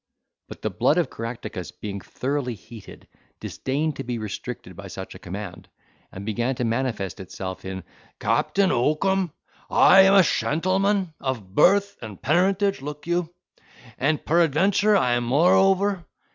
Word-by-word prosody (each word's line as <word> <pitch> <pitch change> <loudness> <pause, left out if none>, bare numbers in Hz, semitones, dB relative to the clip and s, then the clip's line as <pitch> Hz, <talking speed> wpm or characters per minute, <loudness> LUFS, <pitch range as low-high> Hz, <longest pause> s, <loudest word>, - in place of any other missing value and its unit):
But - - -11
the - - -1
blood - - +2
of - - +1
Caractacus 115 -5 -6
being 100 -2 -7
thoroughly 130 0 -3
heated, 110 +1 -13 0.3
disdained 145 +3 -2
to - - -4
be 120 0 -3
restricted 110 -3 -6
by - - -9
such - - -8
a - - -12
command, 95 -1 -8 0.4
and 95 +2 -8
began 120 +4 -1
to 125 - -3
manifest 115 -4 -2
itself 95 0 -7
in, 95 -1 -5 0.4
"Captain 195 -1 +1
Oakum, 170 +8 +1 0.4
I 195 - +7
am 195 +1 +6
a 195 - +8
shentleman 185 - 0
of 115 -8 -4
birth 200 - +4
and 110 -4 -8
parentage 195 +3 +1
(look 150 +1 -7
you), 175 -1 -1 0.7
and 145 +4 0
peradventure 175 +6 +3
I 125 -9 +2
am 120 0 +1
moreover." 190 +7 +3
145 Hz, 145 wpm, -24 LUFS, 115-185 Hz, 0.7 s, a